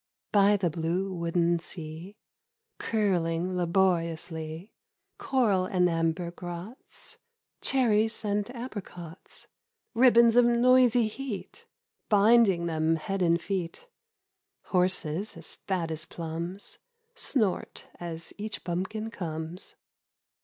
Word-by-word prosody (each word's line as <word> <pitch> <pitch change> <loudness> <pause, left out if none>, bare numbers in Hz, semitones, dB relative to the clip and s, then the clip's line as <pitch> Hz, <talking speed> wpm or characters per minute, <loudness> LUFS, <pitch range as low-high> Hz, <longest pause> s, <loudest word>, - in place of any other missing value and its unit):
BY 205 0 +5
the 185 -3 0
blue 175 +4 -1
wooden 170 0 +1
sea 165 +3 -9 0.3
— 455 -1 -59
Curling 180 -4 0
laboriously, 170 -1 -1 0.5
Coral 220 -9 +2
and 180 -1 +2
amber 165 +1 -1
grots 175 +7 -9 0.4
(Cherries 225 -4 +2
and 205 +1 0
apricots) 185 -8 -9 0.5
Ribbons 235 -1 +6
of 245 0 +6
noisy 245 -1 +4
heat 225 -2 -7 0.4
Binding 205 -4 +5
them 160 -1 +1
head 195 +4 -3
and 170 -1 +3
feet, 190 - -4 0.7
Horses 180 0 0
as - - -8
fat 175 -4 -3
as 155 0 -4
plums 170 +3 -4 0.3
Snort 235 - -1
as 170 -1 -6
each 215 +1 -3
bumpkin 190 +6 -3
comes. 165 -2 -5
185 Hz, 100 wpm, -28 LUFS, 170-220 Hz, 0.7 s, Ribbons